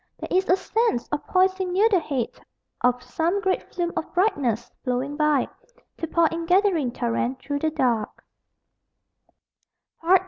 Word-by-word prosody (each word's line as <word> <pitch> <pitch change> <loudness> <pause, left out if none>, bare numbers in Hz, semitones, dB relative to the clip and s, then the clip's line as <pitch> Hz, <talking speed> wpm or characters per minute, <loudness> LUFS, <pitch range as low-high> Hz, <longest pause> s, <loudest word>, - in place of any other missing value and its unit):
There - - -4
is 380 +1 +2
a 365 - +6
sense 435 - 0
of 300 - -2
poising 375 0 +2
near 405 +4 +5
the 400 -5 +3
head 275 -7 -2 0.5
Of 250 0 +2
some 330 +9 0
great 380 -1 0
flume 345 -1 -2
of - - -3
brightness, 255 - +1
flowing 255 +3 -1
by 300 -3 +2 0.5
To 330 - -2
pour 335 +1 +3
in 330 0 -4
gathering 360 - +3
torrent 240 +1 -1
through 285 +2 -3
the 315 - +1
dark. 250 -8 -1
315 Hz, 145 wpm, -24 LUFS, 250-370 Hz, 0.5 s, a